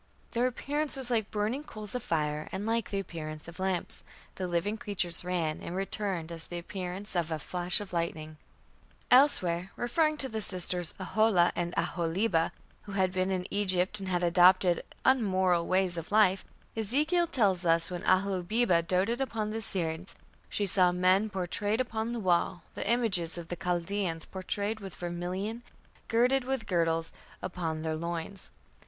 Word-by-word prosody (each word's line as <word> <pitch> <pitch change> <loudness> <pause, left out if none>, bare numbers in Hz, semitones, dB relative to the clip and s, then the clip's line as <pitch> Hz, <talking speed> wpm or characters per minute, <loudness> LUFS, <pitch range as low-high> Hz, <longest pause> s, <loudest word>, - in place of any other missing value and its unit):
Their 240 +2 +2
appearance 290 +4 0
was 260 -2 -3
like 220 -3 +1
burning 220 +7 -1
coals 215 -7 -8
of 250 - -2
fire 150 -7 -1
and 195 +2 -4
like 230 0 0
the 200 - -2
appearance 155 -5 -5
of 170 +2 -10
lamps.... 190 -2 -1 0.3
The 185 - -4
living 175 +5 0
creatures 195 -7 -1
ran 170 -4 -1
and 175 - -6
returned 190 -3 -2
as 165 -1 -1
the 175 - -5
appearance 185 +3 -5
of 170 -2 0
a 160 - -1
flash 175 +4 0
of 205 -3 -8
lightning." 155 -2 -3 0.7
Elsewhere, 190 -10 +4
referring 305 +6 +1
to 270 - -2
the 220 -3 -4
sisters, 180 -3 +1
Aholah 190 -2 +3
and 175 0 -1
Aholibah, 170 0 +1 0.3
who 205 - -8
had 190 -2 +2
been 185 0 0
in 185 -1 -1
Egypt 195 0 +2
and 190 -1 -5
had 180 -1 0
adopted 180 0 +5 0.2
unmoral 190 -9 +3
ways 185 -2 +2
of 165 +3 -6
life 200 -3 +4 0.3
Ezekiel 300 - +2
tells 200 - +2
that 165 -2 +3
when 175 -1 -4
Aholibah 190 +1 +2
"doted 190 +9 +1
upon 220 -5 -2
the 220 - -3
Assyrians" 180 -4 -2 0.3
she 205 - -1
"saw 180 -1 +4
men 185 +4 +3
pourtrayed 205 +3 -1
upon 225 -2 -2
the 240 - -3
wall, 175 -2 +1
the - - -3
images 195 -9 +2
of 170 -1 -7
the 175 - -3
Chaldeans 175 -1 -1
pourtrayed 200 +3 -2
with 195 -3 -8
vermilion, 180 +6 -4 0.5
girded 250 +3 +3
with 265 -2 -2
girdles 165 -2 0 0.3
upon 165 -3 -3
their 160 -1 -1
loins". 170 +4 -5
185 Hz, 160 wpm, -30 LUFS, 175-215 Hz, 0.7 s, adopted